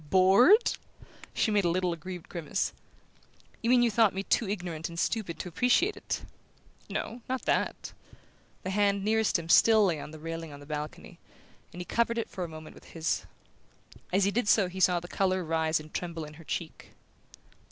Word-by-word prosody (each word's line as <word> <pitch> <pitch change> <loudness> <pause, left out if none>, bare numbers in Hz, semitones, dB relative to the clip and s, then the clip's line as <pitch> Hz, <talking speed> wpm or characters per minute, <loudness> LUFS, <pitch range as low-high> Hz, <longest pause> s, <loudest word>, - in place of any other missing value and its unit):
"BORED?" 200 - +5 0.5
She 220 - +1
made 205 -1 +3
a 175 - +2
little 180 0 0
aggrieved 175 +1 -8
grimace. 170 +2 -2 0.9
"You 230 - 0
mean 245 -1 +5
you 235 - +3
thought 215 -3 +3
me 195 - -2
too 210 0 +1
ignorant 175 -5 -4
and 170 - -9
stupid 185 -2 -1
to - - -5
appreciate 250 - +2
it?" - - -4 0.6
"No; 240 +2 -4
not 260 0 -2
that." - - -1 0.7
The 185 - -3
hand 200 0 +1
nearest 220 -1 +2
him 165 -1 -7
still 220 +4 +6
lay 170 -5 0
on - - -7
the 155 - -10
railing 165 0 -6
of 145 - -10
the 145 - -12
balcony, 150 0 -6 0.5
and 180 - -7
he - - -6
covered 235 +3 0
it 230 - -3
for 185 - -4
a - - -3
moment 155 0 -10
with - - -16
his. 165 -1 -2 0.8
As 195 +2 +3
he 200 - +2
did 235 0 0
so 200 -3 +4
he 190 +1 -7
saw 180 -1 +4
the 175 - -10
colour 185 0 0
rise 160 -1 +1
and 155 0 -12
tremble 170 -3 -4
in 150 - -11
her - - -13
cheek. - - -6
185 Hz, 195 wpm, -29 LUFS, 165-215 Hz, 0.9 s, still